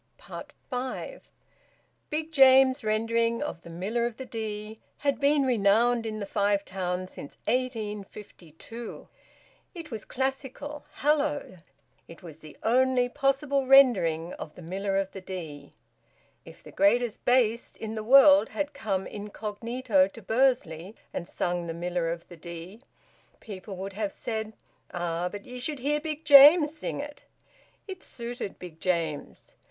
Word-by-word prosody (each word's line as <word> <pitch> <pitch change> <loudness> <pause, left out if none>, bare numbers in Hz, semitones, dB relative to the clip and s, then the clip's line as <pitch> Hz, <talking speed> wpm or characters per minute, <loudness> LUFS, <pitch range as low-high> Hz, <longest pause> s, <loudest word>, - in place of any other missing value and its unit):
FIVE. 260 - -5 0.8
Big 310 +1 -3
James's 265 -2 +6
rendering 230 +3 +1
of 175 - -5
"The - - -12
Miller 205 +8 -1
of 240 -1 -8
the 260 - -7
Dee" 215 -2 -6 0.2
had 280 -1 0
been 285 0 +3
renowned 230 0 +3
in 215 -1 -4
the 200 - -3
Five 200 0 +1
Towns 185 -1 -3
since 145 - -10
1852. 215 - -5 0.7
It 330 -4 -8
was 220 -2 -5
classical, 270 +2 -4
hallowed. 290 - 0 0.5
It 165 - -14
was 160 -3 -11
the 155 -2 -13
only 250 +1 +3
possible 275 0 0
rendering 190 -12 +5
of 150 - -8
"The 180 - -11
Miller 195 +3 -2
of 195 -1 -1
the 195 - -8
Dee." 160 -7 -8 0.7
If - - -14
the - - -12
greatest 225 +3 +2
bass 240 -2 +2
in 220 -1 -6
the 215 -1 -4
world 275 +5 +7
had 295 0 -3
come 200 -8 -2
incognito 210 0 -1
to 215 +4 -13
Bursley 215 -6 0 0.2
and 170 - -4
sung 175 -1 -2
"The 165 - -4
Miller 175 0 -2
of 170 0 -6
the 175 - -12
Dee," 170 +6 -9 0.6
people 200 -2 -8
would 195 +1 -6
have 205 0 -2
said, 220 0 -4 0.4
"Ah! 175 0 -2
But 205 +1 -9
ye 250 0 -8
should 295 +4 -3
hear 290 +4 0
Big 310 0 -5
James 295 +2 +8
sing 310 - -4
it!" 290 0 -10 0.6
It 380 -2 -7
suited 235 -3 -6
Big 170 -3 -11
James. 165 -5 -3
220 Hz, 145 wpm, -27 LUFS, 185-265 Hz, 0.8 s, James